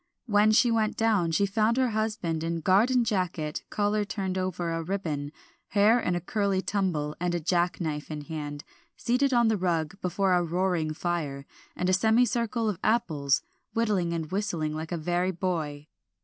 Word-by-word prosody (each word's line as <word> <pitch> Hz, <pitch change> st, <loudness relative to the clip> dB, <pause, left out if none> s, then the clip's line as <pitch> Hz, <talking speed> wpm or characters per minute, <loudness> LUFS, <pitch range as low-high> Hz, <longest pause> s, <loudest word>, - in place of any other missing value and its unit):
When 210 Hz, -2 st, +4 dB
she 235 Hz, +2 st, +4 dB
went 220 Hz, -2 st, +1 dB
down, 215 Hz, -7 st, +2 dB
she 180 Hz, +5 st, +2 dB
found 215 Hz, +4 st, +1 dB
her 260 Hz, -1 st, +3 dB
husband 210 Hz, -7 st, -1 dB
in 165 Hz, 0 st, -2 dB
garden 230 Hz, +9 st, +4 dB
jacket, 180 Hz, -8 st, -2 dB
collar 210 Hz, 0 st, +1 dB
turned 195 Hz, -2 st, -3 dB
over 185 Hz, -2 st, -2 dB
a 165 Hz, 0 st, -2 dB
ribbon, 160 Hz, -5 st, -3 dB, 0.4 s
hair 215 Hz, +4 st, +4 dB
in 180 Hz, -6 st, -1 dB
a -, -, 0 dB
curly 200 Hz, +2 st, 0 dB
tumble, 180 Hz, -7 st, -1 dB
and 175 Hz, -2 st, -1 dB
jackknife 170 Hz, -4 st, 0 dB
in 155 Hz, -1 st, -5 dB
hand, 145 Hz, -1 st, -6 dB, 0.3 s
seated 250 Hz, +3 st, +1 dB
on 240 Hz, -2 st, +4 dB
the 220 Hz, -1 st, +2 dB
rug 175 Hz, 0 st, -1 dB
before 185 Hz, +1 st, +1 dB
a 180 Hz, -, +4 dB
roaring 175 Hz, -2 st, 0 dB
fire, 150 Hz, -6 st, -3 dB, 0.3 s
and 180 Hz, -, -1 dB
a 185 Hz, -, +3 dB
semicircle 230 Hz, +3 st, +2 dB
of 200 Hz, -4 st, -2 dB
apples, 155 Hz, -11 st, +1 dB, 0.3 s
whittling 205 Hz, -7 st, +1 dB
and 165 Hz, -1 st, -3 dB
whistling 175 Hz, -6 st, -1 dB
like 160 Hz, +1 st, -5 dB
a 175 Hz, -, -1 dB
very 175 Hz, +3 st, 0 dB
boy. 165 Hz, -5 st, -3 dB
185 Hz, 165 wpm, -27 LUFS, 165-215 Hz, 0.4 s, When